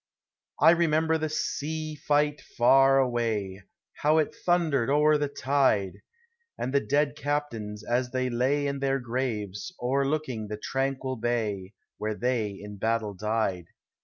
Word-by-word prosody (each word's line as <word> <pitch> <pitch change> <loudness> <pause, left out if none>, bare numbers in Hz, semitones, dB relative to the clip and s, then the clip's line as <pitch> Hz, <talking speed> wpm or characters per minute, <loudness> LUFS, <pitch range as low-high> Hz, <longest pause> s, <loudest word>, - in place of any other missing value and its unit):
I 160 +4 +7
remember 160 -1 +2
the 155 0 -1
sea 155 +1 -3
tight 150 0 +2 0.2
far 135 +3 +6
away, 115 -7 0 0.4
How 155 +2 +3
it 155 - +1
thundered 160 -8 +1
o'er 150 +1 +4
the 145 - 0
tide! 130 -10 +1 0.6
Ami 130 - -2
the 140 - +3
dead 145 +1 +1
captains, 130 -9 -3
as 120 +2 0
they 130 0 -1
lay 130 +4 +1
In 140 -1 -2
their 135 0 +1
graves, 115 - -3
o'erlooking 135 -2 -1
the 105 0 -5
tranquil 135 +2 -2
bay 110 -5 -2 0.3
Where 110 0 -2
they 120 -2 0
in 100 +1 -9
battle 110 0 -1
died. 100 -3 -1
130 Hz, 135 wpm, -27 LUFS, 110-145 Hz, 0.6 s, I